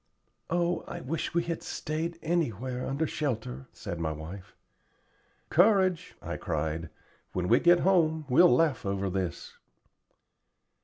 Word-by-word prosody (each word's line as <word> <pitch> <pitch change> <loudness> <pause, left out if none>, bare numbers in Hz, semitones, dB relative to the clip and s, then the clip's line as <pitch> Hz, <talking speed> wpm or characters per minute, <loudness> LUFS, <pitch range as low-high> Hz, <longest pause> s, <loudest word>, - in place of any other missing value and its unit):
"Oh, 175 +1 0
I - - -5
wish 160 +5 -3
we 170 - +3
had 170 -1 -3
stayed 165 +2 -3
anywhere 130 - -1
under 140 +4 0
shelter," 110 - -3
said 85 - -6
my 80 -1 -1
wife. 85 +6 -8 1.0
"Courage," 185 -1 +3
I - - -4
cried. 80 +1 -2 0.4
"When 90 -1 -1
we 120 +5 +5
get 175 0 +5
home, 160 -5 +3
we'll 170 +7 +6
laugh 165 -7 +3
over 100 -1 -1
this." 95 -2 -4
140 Hz, 125 wpm, -29 LUFS, -, 1.0 s, we'll